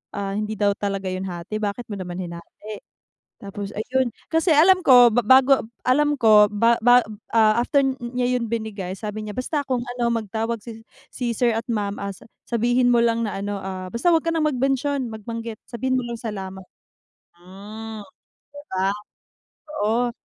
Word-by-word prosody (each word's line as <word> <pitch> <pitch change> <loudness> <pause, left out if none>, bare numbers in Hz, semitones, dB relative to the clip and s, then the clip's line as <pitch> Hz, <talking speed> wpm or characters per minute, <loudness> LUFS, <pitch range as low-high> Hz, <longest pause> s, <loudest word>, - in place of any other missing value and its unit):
ah, 200 -1 -3
hindi 215 +1 -3
daw 205 -1 +3
talaga 195 -1 -3
yun 185 +1 -4
hati, 175 +3 -6
bakit 210 +3 -3
mo 205 - -4
naman 180 -1 -6
hinati?" 175 +5 -9 0.6
Tapos 200 0 -7
ayun, 255 +4 0 0.2
kasi 325 +3 +2
alam 365 +5 +6
ko 245 -4 +8
ba 245 - +4
ba 260 +3 +8
bago, 265 -4 +2 0.2
alam 295 +3 +3
ko 215 -3 +6
ba 230 +3 +3
ba 245 +1 +6 0.3
ah, 220 +1 +5
after 280 +3 +2 0.2
niya 250 +1 -1
yun 235 - -2
binigay 215 -5 -4
sabi 215 +1 -6
niya, 210 - -7
"Basta 285 +4 -1
kung 250 -2 0
ano 240 -1 +1
magtawag 225 +1 -2 0.6
si 250 - -5
sir 240 0 +2
at 225 +1 -3
ma'am, 205 -2 -2
ah, 200 0 -4 0.4
sabihin 245 +1 +2
mo 240 - +4
lang 230 0 +1
na 200 - -5
ano, 205 0 -3
ah, 185 -1 -6
basta 235 +9 0
wag 325 0 +2
ka 330 - +1
nang 315 -2 +1
mag 285 - -2
mention, 270 -1 0
mag 220 - -7
banggit, 230 -1 -5
sabihin 255 +2 -1
mo 255 - -3
lang 235 - -4
salamat." 190 -5 -6 0.8
Hmm. 210 +4 -9 0.5
'Di 290 - -9
ba? 190 +1 +1 1.0
Oo, 240 +3 +1
225 Hz, 180 wpm, -23 LUFS, 205-250 Hz, 1.0 s, ko